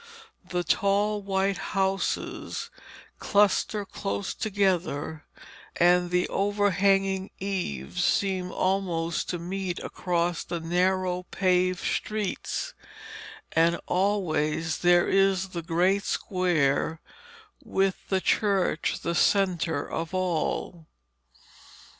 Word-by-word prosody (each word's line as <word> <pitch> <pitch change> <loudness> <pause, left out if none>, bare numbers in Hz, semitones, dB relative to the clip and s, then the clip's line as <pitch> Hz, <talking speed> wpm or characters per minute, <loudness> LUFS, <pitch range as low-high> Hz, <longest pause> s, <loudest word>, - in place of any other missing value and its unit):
The 180 -1 -1
tall 205 +4 +1
white 195 0 0 0.2
houses 195 0 -1 0.5
cluster 205 0 +2
close 195 0 -3
together, 180 -7 -1 0.5
and 175 0 +4
the 180 0 +1
overhanging 195 -1 +1
eaves 180 - -3
seem 185 -2 +1
almost 175 -4 -1
to 175 - -1
meet 180 +1 -4
across 175 -2 -1
the 170 - -4
narrow 180 +2 +1
paved 185 -1 +1
streets, 215 -3 -2 0.8
and 165 +1 +3
always 165 -5 0
there 175 0 +4
is 195 -1 +2
the 175 -2 -5
great 180 +5 +1
square, 160 -4 0 0.6
with 195 -5 +1
the 190 -1 +1
church 195 -6 +1
the 170 - -1
centre 175 -6 +1
of 165 +3 -4
all. 175 -2 -2
185 Hz, 95 wpm, -27 LUFS, 170-195 Hz, 0.8 s, and